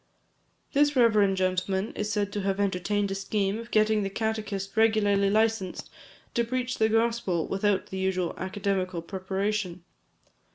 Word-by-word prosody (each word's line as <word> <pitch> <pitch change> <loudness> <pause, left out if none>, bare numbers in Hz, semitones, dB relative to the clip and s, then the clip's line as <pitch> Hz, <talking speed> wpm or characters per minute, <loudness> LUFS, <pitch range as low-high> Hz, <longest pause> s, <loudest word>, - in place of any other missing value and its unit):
This 290 +1 +3
reverend 210 -6 +4
gentleman 190 +2 0
is 210 0 -2
said 205 -1 -1
to 205 - -2
have 195 0 -1
entertained 200 +1 0
a - - 0
scheme 195 +1 -1
of 230 0 -9
getting 215 -1 +3
the 195 - -2
catechist 210 -2 -3
regularly 210 -3 +3
licensed 215 -3 0 0.4
to 235 - +2
preach 250 +1 -2
the 220 0 +4
gospel 225 -7 +1
without 195 0 0
the 190 - -4
usual 185 -2 0
academical 185 -2 -2
preparation. 190 0 -3
200 Hz, 140 wpm, -27 LUFS, 190-220 Hz, 0.4 s, reverend